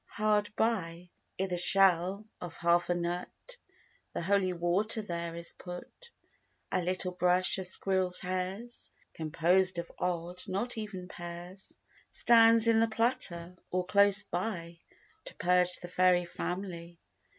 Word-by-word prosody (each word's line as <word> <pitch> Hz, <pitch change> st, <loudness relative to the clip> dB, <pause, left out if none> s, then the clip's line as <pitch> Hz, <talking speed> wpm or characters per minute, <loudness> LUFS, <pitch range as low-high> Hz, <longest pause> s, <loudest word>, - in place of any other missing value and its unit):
Hard 210 Hz, -1 st, 0 dB
by, 180 Hz, -6 st, -2 dB, 0.3 s
i' 190 Hz, -, +1 dB
th' 180 Hz, -2 st, -1 dB
shell 190 Hz, +2 st, +4 dB, 0.2 s
of 175 Hz, -2 st, -8 dB
half 170 Hz, +1 st, +1 dB
a 175 Hz, -, +1 dB
nut, 175 Hz, +1 st, -3 dB, 0.8 s
The -, -, -4 dB
holy 190 Hz, 0 st, +1 dB
water 180 Hz, +6 st, 0 dB
there 170 Hz, -3 st, -5 dB
is 170 Hz, 0 st, -3 dB
put; 180 Hz, -, -11 dB, 0.6 s
A 185 Hz, -, 0 dB
little 185 Hz, +1 st, -1 dB
brush 180 Hz, +1 st, +2 dB
of 185 Hz, -, -4 dB
squirrels' 185 Hz, -1 st, +3 dB
hairs, 185 Hz, +6 st, -5 dB, 0.2 s
Composed 175 Hz, +4 st, +1 dB
of 170 Hz, 0 st, -6 dB
odd, 175 Hz, 0 st, -3 dB
not 200 Hz, +6 st, -3 dB
even 210 Hz, -5 st, -7 dB
pairs, 175 Hz, +2 st, -9 dB, 0.3 s
Stands 230 Hz, -1 st, +5 dB
in 225 Hz, -1 st, +4 dB
the 225 Hz, -, +3 dB
platter, 220 Hz, -7 st, 0 dB
or 180 Hz, 0 st, -2 dB
close 200 Hz, +2 st, +4 dB
by, 170 Hz, -2 st, -5 dB, 0.5 s
To -, -, -7 dB
purge 180 Hz, 0 st, +2 dB
the 175 Hz, -, -7 dB
fairy 180 Hz, 0 st, +2 dB
family. 175 Hz, -1 st, -6 dB
180 Hz, 135 wpm, -30 LUFS, 175-200 Hz, 0.8 s, Stands